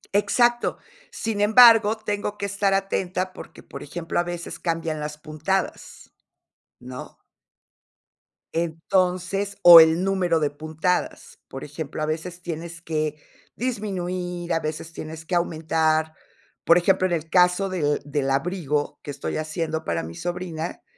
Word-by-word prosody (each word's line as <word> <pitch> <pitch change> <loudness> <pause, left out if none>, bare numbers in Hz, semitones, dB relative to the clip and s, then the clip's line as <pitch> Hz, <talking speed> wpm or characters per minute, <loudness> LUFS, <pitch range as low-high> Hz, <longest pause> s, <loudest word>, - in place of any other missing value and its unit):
Exacto, 240 +3 +2 0.3
sin 220 -2 -3
embargo, 225 0 +7
tengo 210 -1 -3
que 200 - -3
estar 200 0 +1
atenta 185 -1 -2
porque, - - -12
por - - -10
ejemplo, 165 +4 -4
a - - +2
veces 175 -1 -6
cambian 165 -2 -2
las 150 0 -5
puntadas, 155 +6 -4 0.7
¿no? 125 +1 -10 1.4
Entonces 185 +4 -1
o 170 -1 +12
el 160 +2 +5
número 185 -4 +1
de 150 -2 0
puntadas. 155 +4 -3
Por 135 - -8
ejemplo, 150 0 -5
a - - +1
veces 170 +3 -5
tienes 170 0 -6
que 155 -2 -2 0.4
disminuir, 180 -7 -3
a 165 - +1
veces 155 +1 -5
tienes 160 0 -8
que 180 - -6
aumentar. 160 -2 +1 0.5
Por 170 - +5
ejemplo, 185 +1 +2
en 180 - -2
el 160 -1 -3
caso 180 +2 +4
del 150 -6 0
del 145 -1 -1
abrigo 150 0 -1
que - - -11
estoy 140 0 -4
haciendo 155 0 -3
para 85 -1 -2
mi 80 +1 -8
sobrina, 175 - -5
170 Hz, 135 wpm, -24 LUFS, 155-185 Hz, 1.4 s, o